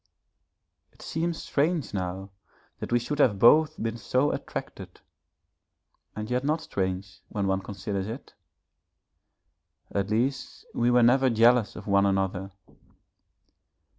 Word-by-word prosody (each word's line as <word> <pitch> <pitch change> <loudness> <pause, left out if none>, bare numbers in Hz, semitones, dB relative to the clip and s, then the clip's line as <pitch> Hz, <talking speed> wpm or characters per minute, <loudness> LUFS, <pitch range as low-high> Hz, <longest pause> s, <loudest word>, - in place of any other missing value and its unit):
It - - -16
seems 165 +1 -3
strange 150 - 0
now 95 0 -4 0.5
that - - -6
we 120 - +4
should 140 +5 -3
have 115 -8 +4
both 150 +9 +5
been 115 +1 -2
so 130 +6 +1
attracted, - - -7 1.2
and 105 +1 -5
yet 125 +2 -1
not 155 +3 0
strange 95 -4 -4
when 100 -2 -2
one 95 0 0
considers 100 0 -4
it. 115 +6 -8 1.6
At 100 0 -1
least 125 +5 -2
we 120 +1 +1
were 125 0 +4
never 130 +2 +4
jealous 115 0 +4
of - - -9
one 100 -1 +3
another. 95 -1 -1
115 Hz, 125 wpm, -27 LUFS, 100-130 Hz, 1.6 s, both